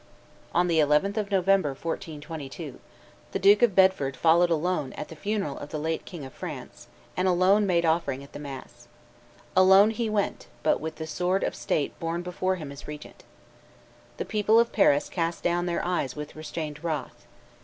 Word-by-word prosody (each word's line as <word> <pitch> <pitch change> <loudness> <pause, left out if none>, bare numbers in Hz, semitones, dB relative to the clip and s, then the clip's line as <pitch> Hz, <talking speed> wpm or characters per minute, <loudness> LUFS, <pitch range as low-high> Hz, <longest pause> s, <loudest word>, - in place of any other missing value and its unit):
On 175 +1 +2
the 165 -2 +2
11th 150 +7 +3
of 210 -2 -1
November, 190 -7 +2
1422, 155 -3 -6 0.5
the - - +1
Duke 205 +3 +5
of 235 -6 +4
Bedford 185 -9 +3
followed 170 +2 +4
alone 165 -4 0
at 150 - -7
the 160 - -9
funeral 195 -3 -3
of 145 - -8
the 155 - -4
late 160 +2 -2
king 170 -7 -8
of 130 - -11
France, - - -8 0.3
and 185 +1 +1
alone 190 +3 +4
made 170 -2 +2
offering 160 -5 0
at 140 - -15
the - - -7
mass. 135 -4 -9 0.7
Alone 190 +3 +7
he 225 0 -2
went, 205 - -1 0.2
but - - +2
with 160 +1 -5
the 160 - -6
sword 180 +4 0
of - - -1
state 145 - -2
borne 165 +1 -2
before 185 +1 -1
him 155 -6 -7
as 140 0 -10
regent. 150 - -9 0.9
The - - -3
people 215 +1 +3
of 235 0 +2
Paris 145 -8 +3
cast 170 -1 -2
down 175 0 +1
their 170 - -1
eyes 175 -8 -1
with 150 0 -7
restrained 155 -1 -6
wrath. 155 -6 -4
170 Hz, 180 wpm, -27 LUFS, 150-190 Hz, 0.9 s, Alone